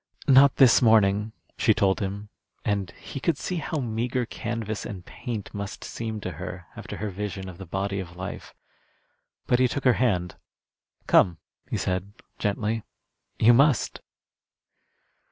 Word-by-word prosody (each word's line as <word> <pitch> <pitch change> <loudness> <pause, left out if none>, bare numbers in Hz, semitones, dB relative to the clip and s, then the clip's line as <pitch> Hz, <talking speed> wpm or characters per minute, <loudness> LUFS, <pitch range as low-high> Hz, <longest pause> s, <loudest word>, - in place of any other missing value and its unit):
"Not 135 0 +7
this 130 -3 +6
morning," 105 -2 +4 0.3
she 110 - +4
told 100 -3 +2
him, 100 +1 -4 0.4
and 100 -3 0
he 135 - -7
could 150 +3 +1
see 180 - -3
how 160 0 -3
meagre 120 0 -1
canvas 115 -2 -4
and 95 -6 -7
paint 120 -5 -6
must 100 -1 -5
seem 110 -2 -4
to 95 - -4
her 90 -1 -6
after - - -7
her 105 -1 -3
vision 95 -1 -5
of 90 -1 -9
the 95 - -8
body 100 +3 -2
of 90 -2 -7
life. 95 +2 -7 0.9
But 125 - +2
he 130 - +5
took 140 +3 -3
her 125 - +5
hand. 90 -8 +1 0.7
"Come," 85 -3 +4 0.3
he - - -1
said, 95 +2 -2 0.3
gently; 105 +2 -1 0.6
"you 120 +2 +6
must." 135 -3 +3
105 Hz, 150 wpm, -26 LUFS, 95-120 Hz, 0.9 s, Not